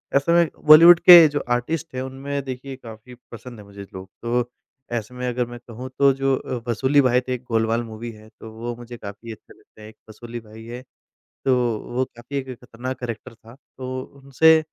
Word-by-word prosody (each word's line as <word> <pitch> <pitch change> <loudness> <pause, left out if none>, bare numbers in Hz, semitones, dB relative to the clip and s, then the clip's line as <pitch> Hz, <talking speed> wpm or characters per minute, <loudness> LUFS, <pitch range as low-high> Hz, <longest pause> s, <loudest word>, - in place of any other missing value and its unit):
ऐसे 140 +4 +2
में 170 -2 +4 0.2
बॉलीवुड 165 +3 +9
के 175 -3 +10
जो 145 -1 -2 0.2
आर्टिस्ट 150 +4 -4
हैं 130 - -3
उनमें 135 +2 -5
देखिए 130 +1 -7
काफ़ी 120 0 -13 0.2
पसंद 120 0 -10
है 105 - -12
मुझे 100 0 -11
लोग। 95 0 -9
तो 120 +1 -1 0.5
ऐसे 115 +2 -7
में 125 0 -4
अगर 125 0 -1
मैं 120 0 -10
कहूँ 125 +2 -8
तो 140 -1 +6
जो 135 0 0
अ, 120 -2 -6
वसूली 130 +5 +3
भाई 125 -1 +2
थे 130 - -1
एक 125 0 -6
गोलमाल 115 +1 +1
मूवी 115 +1 -8
है 110 0 -16
तो 110 - -10
वो 120 +2 -6
मुझे 120 0 -10
काफ़ी 110 +2 -9
अच्छे 110 - -14
लगते - - -22
है 105 - -11
एक 110 - -18
वसूली 120 +2 -9
भाई 110 0 -14
है, 120 +2 -8 0.6
तो 130 - +3 0.4
वो 130 +1 +1
काफ़ी 120 +4 -8
एक 135 -1 -6 0.2
खतरनाक 125 +2 -6
कैरेक्टर 120 0 -7
था, 115 0 -17 0.2
तो 130 0 -5 0.2
उनसे 160 +4 +5
125 Hz, 205 wpm, -22 LUFS, 115-135 Hz, 0.6 s, के